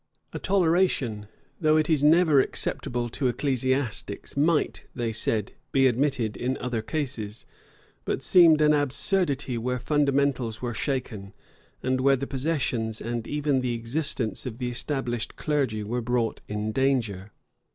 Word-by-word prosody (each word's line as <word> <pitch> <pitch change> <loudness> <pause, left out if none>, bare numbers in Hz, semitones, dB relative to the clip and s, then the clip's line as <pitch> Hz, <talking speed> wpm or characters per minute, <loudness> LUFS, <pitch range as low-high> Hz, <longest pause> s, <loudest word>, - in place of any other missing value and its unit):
A - - -4
toleration, 165 - +1 0.3
though 155 -1 +4
it 155 -1 +2
is 155 -4 +2
never 155 -1 +5
acceptable 120 -2 -2
to 130 +3 -1
ecclesiastics, 130 -4 -1
might, 150 +2 +1
they 115 -2 -2
said, 110 -1 -1 0.2
be 135 -1 +4
admitted 125 -3 +1
in 130 +2 -2
other 125 -3 -2
cases; 115 -5 -4 0.6
but - - -2
seemed 165 -4 +6
an 150 0 +5
absurdity 145 - 0
where 125 +2 -1
fundamentals 140 -4 +1
were 120 -1 -3
shaken, 110 -5 -3 0.5
and 130 0 0
where 135 +1 +5
the 135 +1 -3
possessions 130 -6 -2
and 115 0 -4
even 145 -2 0
the 125 -2 -1
existence 115 0 -2
of 115 -2 -6
the 125 -1 -2
established 120 -2 -2
clergy 135 -8 -1
were 120 +4 -2
brought 120 -1 -1
in 105 +1 -3
danger. 110 -7 0
130 Hz, 140 wpm, -26 LUFS, 115-145 Hz, 0.6 s, seemed